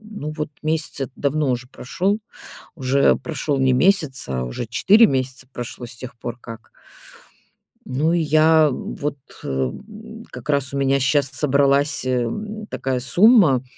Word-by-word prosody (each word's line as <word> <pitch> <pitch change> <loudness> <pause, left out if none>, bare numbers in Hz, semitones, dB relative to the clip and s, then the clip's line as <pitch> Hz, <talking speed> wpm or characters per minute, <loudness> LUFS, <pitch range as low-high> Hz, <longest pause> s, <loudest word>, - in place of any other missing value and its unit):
ну 210 -9 -7
вот, 150 -1 -3
месяц 155 0 -2
этот 135 -1 -4
давно 145 0 0
уже 125 0 -2
прошёл. 190 - -2 0.6
Уже 135 +1 +3
прошёл 150 -2 -3
не 130 -1 +3
месяц, 155 -3 +2
а 65 -2 -2
уже 60 - -5
4 210 - +5
месяца 130 -1 -3
прошло 120 0 -7
с 120 0 -7
тех 125 0 -9
пор 120 0 -6
как 115 -2 -11 1.2
Ну, 145 +6 0
и 175 - +2
я 155 0 +4
вот 145 +3 -5 0.3
о, - - -6
м, 215 - -5
как 150 - -10
раз 140 -2 0
у - - -2
меня 135 0 +2
щас 135 +1 +2
собралась, 140 +1 +2
эм, 205 - -3
такая 130 -8 -3
сумма, 175 - +4
140 Hz, 150 wpm, -21 LUFS, 130-160 Hz, 1.2 s, 4